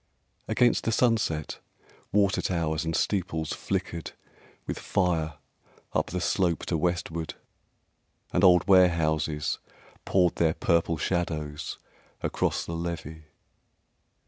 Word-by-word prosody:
Against 120 -2 +3
the 115 - +2
sunset, 110 - +1 0.5
water 100 -1 +3
towers 80 -3 -1
and 80 0 -1
steeples 85 -5 -1
Flickered 85 -1 -3 0.5
with - - -4
fire 80 -4 0 0.6
up - - +1
the 90 - -3
slope 85 -2 +1
to 85 - -1
westward, 85 -1 -2 1.0
And 90 - +2
old 90 -2 +6
warehouses 80 -5 +3 0.4
poured 90 -3 +2
their 80 -1 +2
purple 85 -1 +1
shadows 75 -3 -2 0.5
Across - - 0
the 85 - -5
levee. 80 -2 -5
85 Hz, 105 wpm, -27 LUFS, 80-90 Hz, 1.0 s, old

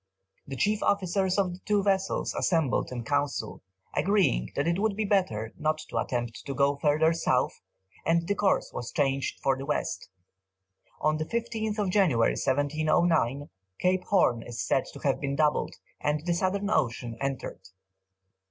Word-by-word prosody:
The 135 - -5
chief 210 +9 +1
officers 190 -1 +1
of 190 -3 +1
the 180 - -10
two 205 0 +1
vessels 195 -1 0
assembled 160 -9 +1
in 120 -2 -4
council, 140 -3 -2 0.3
agreed 190 - +2
that 140 +3 0
it 170 +2 +1
would 215 -1 +1
be 215 +1 -1
better 115 - 0
not 155 0 +1
to - - -1
attempt 120 -2 -3
to 140 - -3
go 140 0 +2
further 155 +3 +3
south, 165 - 0 0.4
and 170 +1 +1
the 205 - +2
course 200 -1 +1
was 120 - -5
changed 135 -2 0
for 135 - +3
the 135 +1 -6
west. 150 - -2 0.9
On 155 0 +2
the 155 - -2
15th 220 -1 -2
January, 170 - +3
1709, 145 0 +1 0.3
Cape 180 0 +2
Horn 120 - +3
is 120 0 -8
said 135 - +1
to - - -10
have 135 -2 +1
been 140 -1 -1
doubled, 150 0 +1 0.2
and 150 +1 -1
the 175 - +1
southern 195 +3 0
ocean 120 - 0
entered. 135 -8 -3
155 Hz, 160 wpm, -28 LUFS, 135-190 Hz, 0.9 s, further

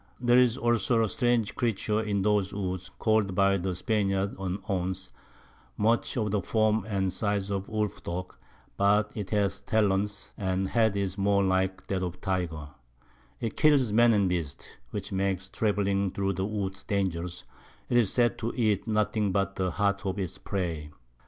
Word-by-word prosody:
There's 125 0 +4
also 120 -2 +2
a - - +1
strange 120 -2 +1
Creature 110 -2 0
in 100 -3 -1
those 105 -2 +2
Woods, 95 -2 -4
call'd 110 -4 +1
by 100 0 +4
the 95 0 -2
Spaniards 100 -1 0
an 95 -1 -2
Ounce, 95 -1 -2 0.7
much 115 +4 +1
of 105 -3 0
the 105 -1 +1
Form 110 +2 +1
and 95 -3 0
Size 100 -2 -1
of 100 -1 -3
a - - -15
Woolf 105 -1 -2
dog; 90 +2 -5 0.4
but 100 +1 +3
it 105 -3 -5
has 100 -2 0
Talons, 100 -1 0
and 95 -1 0
the - - -4
Head 110 -3 +2
is 100 0 -2
more 100 0 +3
like 95 0 0
that 95 -1 -2
of 90 -1 -3
a - - -22
Tyger: 85 -6 -3 0.7
It 115 -2 -3
kills 140 -8 +4
Men 120 +1 +6
and 100 -3 +3
Beasts, 85 -6 -4
which - - -5
makes 95 -1 -1
travelling 100 -2 +1
through 100 +1 -1
the 95 +2 -2
Woods 100 -2 -4
dangerous; 90 -3 -2 0.4
'tis 120 -5 +3
said 120 -1 +2
to 115 0 -2
eat 110 -4 +1
nothing 105 -1 +1
but 100 0 0
the 95 -1 0
Heart 100 +3 0
of 95 - -2
its 95 -4 -4
Prey. 85 -6 -3
100 Hz, 170 wpm, -28 LUFS, 95-110 Hz, 0.7 s, Men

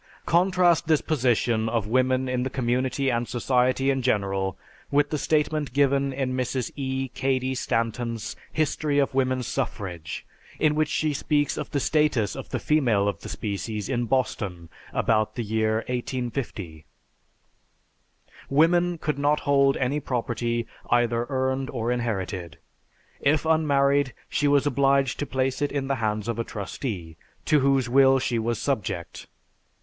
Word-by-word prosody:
Contrast 175 -1 +3
this 155 -3 +4
position 120 -6 +1
of 115 -2 0
woman 130 +3 +1
in 125 -1 -1
the 130 - -1
community 130 +1 0
and 120 0 -1
society 130 +2 +1
in 135 -1 -1
general 100 -5 0 0.3
with 145 +1 +2
the 155 - 0
statement 150 -2 0
given 140 0 +2
in 130 -1 -2
Mrs. 130 -1 -2
E. 135 -1 -2
Cady 130 0 -1
Stanton's 115 -2 -2 0.2
"History 150 -1 0
of 140 -1 +2
Woman's 130 -1 +1
Suffrage," 90 - -4 0.3
in 155 -1 +3
which 155 0 +1
she 155 -1 0
speaks 145 +1 0
of - - -5
the 145 - -1
status 150 -8 +1
of - - -7
the - - -2
female 120 -10 +2
of 100 -4 -2
the - - -9
species 105 0 -4
in 120 -2 -1
Boston 100 -9 -2 0.2
about 110 -1 +1
the 120 - -2
year 110 +1 0
1850. 120 - -4 1.6
"Women 175 +4 +3
could 150 -2 -2
not 145 +1 +2
hold 140 -1 +3
any 135 +3 0
property, 120 -3 -2 0.2
either 120 0 +2
earned 130 0 -1
or 120 -2 -2
inherited. 95 -8 -3 0.6
If 150 +2 +2
unmarried, 140 -4 +2
she 145 - +1
was 145 0 +3
obliged 135 -1 +2
to 145 - -2
place 130 0 -1
it 145 - 0
in 140 -2 -2
the 135 - +1
hands 105 -1 -1
of 115 -1 -2
a - - +1
trustee, 100 - -5 0.3
to 150 - +4
whose 135 -2 +2
will 135 +1 +5
she 120 -2 0
was 115 +1 -1
subject. 100 -11 -3
130 Hz, 150 wpm, -25 LUFS, 115-140 Hz, 1.6 s, will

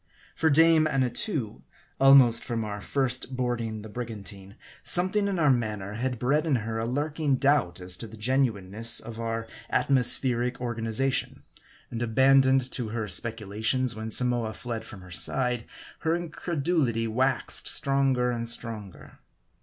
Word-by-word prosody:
For 160 - +2
dame 160 +1 +5
Annatoo, 130 - -1 0.4
almost 135 -4 +6
from 115 -2 -3
our 105 -1 -6
first" 130 0 -1
boarding 115 -4 -2
the - - -8
brigantine, 105 -3 -8 0.3
something 185 +3 +2
in 195 -2 -2
our 150 -4 +4
manner 105 -5 -2
had 125 +3 -3
bred 145 +7 0
in 145 - +2
her 115 0 -3
a 115 - -2
lurk 145 +5 -3
ing 145 -4 +2
doubt 130 -11 +1
as 90 0 -3
to 115 - -6
the 110 +1 -12
genuineness 115 -2 0
of 115 -1 -9
our 115 0 -3 0.2
atmospheric 125 -1 +2
organiza 120 +2 -1
tion; - - -4 0.5
and 115 - -5
abandoned 130 +2 +3
to 120 -3 -3
her 110 -1 -3
speculations 110 +4 -1
when 110 0 -5
Samoa 120 -1 +1
fled 115 -2 -5
from 100 -4 -11
her 90 0 -14
side, 125 +5 0 0.3
her 165 0 0
incredulity 160 -7 -1
waxed 130 +3 +1
stronger 135 -3 +2
and 115 -1 -3
stronger. 110 -5 -5
120 Hz, 145 wpm, -27 LUFS, 110-135 Hz, 0.5 s, almost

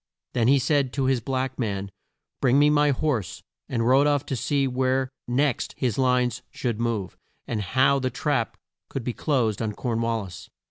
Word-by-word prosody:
Then 115 -1 +2
he 140 +2 +6
said 140 -1 +1
to 135 -2 0
his 130 -1 +2
black 130 +2 -2
man, 100 -4 -2 0.5
"Bring 130 0 +4
me 145 +1 +5
my 150 0 +4
horse," 130 - -1 0.3
and 115 -2 0
rode 135 +3 +5
off 145 -2 +1
to 135 - -3
see 140 +2 0
where 130 0 0 0.2
next 130 +2 0
his 125 -3 -1
lines 125 -2 +2
should 120 -4 -3
move, 115 -5 -2 0.3
and 110 -3 -2
how 130 +6 +3
the 130 -1 -1
trap 135 -5 -1 0.3
could 135 - -4
be 120 - -2
closed 115 - 0
on 110 -2 -2
Corn 115 0 -2
wal 115 -2 0
lis. 90 -2 -10
130 Hz, 185 wpm, -25 LUFS, 115-135 Hz, 0.5 s, he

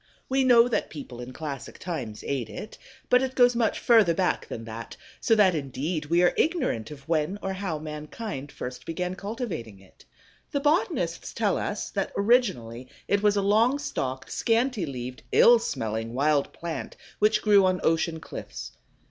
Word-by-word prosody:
We 265 0 +2
know 240 -2 +6
that 245 - -1
people 130 -5 -8
in 125 +1 -7
classic 140 -2 -6
times 130 -12 -5
ate 135 -5 -2
it, 215 - -8 0.3
but 250 0 +5
it 260 0 -2
goes 245 -1 +5
much 230 -3 +1
further 220 -8 +4
back 185 0 0
than 115 - -6
that, 115 +1 -8 0.2
so 225 - +3
that 200 -4 +5
indeed 150 +2 -3
we 170 +3 +3
are 175 - +4
ignorant 260 - 0
of 140 -2 -11
when 165 +4 0
or 195 - -2
how 185 -4 -3
mankind 150 +1 -6
first 125 0 -7
began 180 +2 -2
cultivating 195 - -5
it. 95 -1 -20 0.5
The 285 - 0
botanists 315 +10 0
tell - - +1
us - - -3
that - - -2
originally 190 - +1 0.2
it 200 0 +2
was 205 0 +3
a 200 - +1
long 225 +7 +3
stalked, 135 - -4
scanty 230 -5 +1
leaved, 125 -2 -6
ill 240 0 +7
smelling 115 - -3
wild 145 +1 +2
plant 170 -1 -6 0.2
which 215 +1 +3
grew 205 -3 +6
on 185 -1 +1
ocean 165 0 +1
cliffs. 60 - -8
175 Hz, 170 wpm, -26 LUFS, 135-225 Hz, 0.5 s, ill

